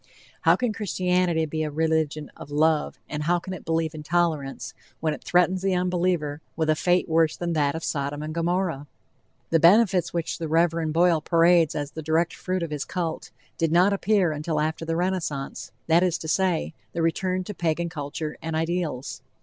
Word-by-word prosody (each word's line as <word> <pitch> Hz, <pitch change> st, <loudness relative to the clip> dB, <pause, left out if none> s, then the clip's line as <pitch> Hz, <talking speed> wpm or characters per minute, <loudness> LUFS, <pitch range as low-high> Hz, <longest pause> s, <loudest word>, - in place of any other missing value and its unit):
How -, -, +5 dB
can 245 Hz, -3 st, -1 dB
Christianity 180 Hz, -5 st, 0 dB
be 155 Hz, +1 st, -3 dB
a 155 Hz, -, -1 dB
religion 155 Hz, -1 st, -1 dB
of -, -, -11 dB
love, 155 Hz, +1 st, +1 dB
and 150 Hz, -, -4 dB
how 170 Hz, +3 st, +2 dB
can 185 Hz, +2 st, -6 dB
it 185 Hz, -, -8 dB
believe 165 Hz, -1 st, -1 dB
in 155 Hz, -, -7 dB
tolerance, 155 Hz, -4 st, -1 dB, 0.3 s
when 155 Hz, -1 st, 0 dB
it -, -, -9 dB
threatens 180 Hz, +1 st, +2 dB
the 190 Hz, -1 st, +1 dB
unbeliever 175 Hz, -4 st, 0 dB
with 160 Hz, -1 st, +1 dB
a -, -, +2 dB
fate 180 Hz, +3 st, +2 dB
worse 160 Hz, -1 st, +2 dB
than 170 Hz, -1 st, -2 dB
that 145 Hz, -2 st, +1 dB
of 160 Hz, -, -5 dB
Sodom 145 Hz, +1 st, -2 dB
and 155 Hz, 0 st, -5 dB
Gomorrah? 170 Hz, -3 st, -1 dB, 0.6 s
The 165 Hz, -, +4 dB
benefits 185 Hz, 0 st, +5 dB
which 170 Hz, -1 st, -3 dB
the 165 Hz, -, -3 dB
Rev. 165 Hz, 0 st, +1 dB
Boyle 170 Hz, 0 st, +3 dB
parades 165 Hz, -1 st, +4 dB
as 145 Hz, -1 st, -3 dB
the 160 Hz, -, -6 dB
direct 160 Hz, +2 st, +1 dB
fruit 185 Hz, -1 st, -3 dB
of 165 Hz, -, -4 dB
his 150 Hz, -2 st, -2 dB
cult, 170 Hz, -3 st, -4 dB, 0.3 s
did 165 Hz, -1 st, +1 dB
not 180 Hz, +4 st, +4 dB
appear 200 Hz, -3 st, +2 dB
until 150 Hz, +1 st, -2 dB
after 160 Hz, +2 st, -2 dB
the 165 Hz, 0 st, -1 dB
Renaissance, 170 Hz, -6 st, -3 dB
that 165 Hz, +1 st, +4 dB
is 180 Hz, -2 st, +1 dB
to 160 Hz, -, -7 dB
say, 175 Hz, -1 st, 0 dB, 0.2 s
the 170 Hz, -, -1 dB
return 185 Hz, +3 st, 0 dB
to 210 Hz, -, -6 dB
Pagan 170 Hz, -1 st, -1 dB
culture 150 Hz, 0 st, -5 dB
and 160 Hz, 0 st, -3 dB
ideals. 160 Hz, -5 st, -2 dB
165 Hz, 190 wpm, -25 LUFS, 155-180 Hz, 0.6 s, How